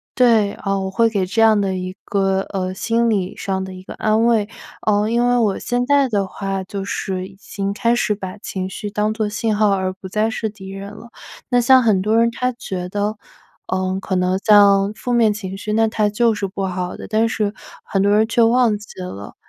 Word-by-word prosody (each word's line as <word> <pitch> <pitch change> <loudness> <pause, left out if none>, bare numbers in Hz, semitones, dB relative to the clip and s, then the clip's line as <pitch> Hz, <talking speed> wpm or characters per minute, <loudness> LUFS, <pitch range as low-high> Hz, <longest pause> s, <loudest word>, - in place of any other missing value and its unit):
对， 230 -5 +4
呃， 195 -1 -2
我 190 0 -3
会 230 +3 +3
给 200 -4 0
这 205 +5 0
样 220 -2 +5
的 195 -1 0
一 185 0 -5
个， 195 -1 +1
呃， 185 -1 -3
心 230 +4 0
理 195 -3 -1
上 190 -1 -2
的 190 0 -7
一 185 0 -10
个 - - -9
安 220 +1 +2
慰， 225 -3 +2 0.4
呃， 210 0 +2
因 240 +1 +2
为 245 - +3
我 210 -5 +1
现 245 0 -1
在 280 -1 +3
的 200 -3 0
话 195 0 -4
就 195 +1 -5
是 185 -2 -3
已 195 - -16
经 200 -1 -4
开 235 +3 +1
始 225 -3 +1
把 190 0 -7
情 190 -1 -4
绪 205 +2 -6
当 210 +1 0
作 220 -1 -1
信 215 +1 -1
号， 210 0 +3
而 190 -1 0
不 190 0 -10
再 215 +3 +1
是 220 0 -3
敌 195 -2 -11
人 195 +1 -8
了。 225 +3 -12 0.4
那 245 -1 +3
像 260 +2 +6
很 215 -6 +2
多 215 +3 +2
人 230 0 +4
他 250 +2 -1
觉 190 -7 -6
得， 205 +2 -1 0.5
呃， 185 0 -1
可 190 - -2
能 180 +1 +1
像 200 -1 +5
负 245 +3 -4
面 230 -3 +4
情 195 -2 -6
绪， 210 +1 -5
那 225 0 +3
它 215 -1 +1
就 225 +1 +2
是 200 -1 -2
不 195 0 -4
好 180 -1 -4
的， - - -8
但 220 +1 +1
是 210 -2 -1 0.3
很 195 - 0
多 200 +1 +3
人 220 +1 +3
却 230 +1 +3
忘 230 -2 +3
记 205 0 -14
了， 100 - -8
205 Hz, 245 characters per minute, -20 LUFS, 190-225 Hz, 0.5 s, 像